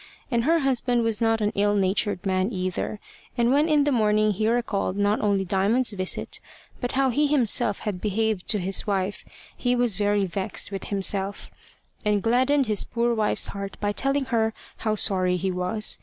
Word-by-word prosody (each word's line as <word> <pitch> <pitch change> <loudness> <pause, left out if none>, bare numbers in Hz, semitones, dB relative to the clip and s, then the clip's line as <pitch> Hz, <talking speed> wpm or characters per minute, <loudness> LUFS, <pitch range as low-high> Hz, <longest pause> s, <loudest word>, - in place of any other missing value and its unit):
And 235 -1 +1
her 330 +2 +4
husband 250 -3 +1
was 225 -1 -1
not 225 -1 +2
an 210 0 +1
ill 205 +1 +2
natured 200 0 0
man 190 +2 0
either, 185 +1 -3 0.4
and 235 0 +3
when 295 +4 +3
in 300 -2 +4
the 290 - +1
morning 215 -3 +2
he 215 +2 -1
recalled 220 -5 0
not 205 +1 +1
only 200 -2 +1
Diamond's 205 +7 +2
visit, 185 -2 -2 0.4
but 245 - -3
how 265 -1 +2
he 295 +5 +2
himself 240 -6 +1
had 195 -4 -4
behaved 215 -2 -1
to 215 - +2
his 195 +2 -1
wife, 195 0 -1 0.3
he 245 0 0
was 240 -5 +1
very 205 -1 +1
vexed 190 +2 -2
with 195 -1 -5
himself, 195 0 -2 0.5
and 210 -1 +1
gladdened 260 +4 +3
his 215 -3 0
poor 235 0 0
wife's 215 -2 +1
heart 200 -1 -6
by 205 0 0
telling 275 +5 0
her 225 -3 0 0.2
how 215 -1 -1
sorry 185 -3 +2
he 190 +2 -1
was. 180 +4 0
210 Hz, 185 wpm, -25 LUFS, 195-240 Hz, 0.5 s, her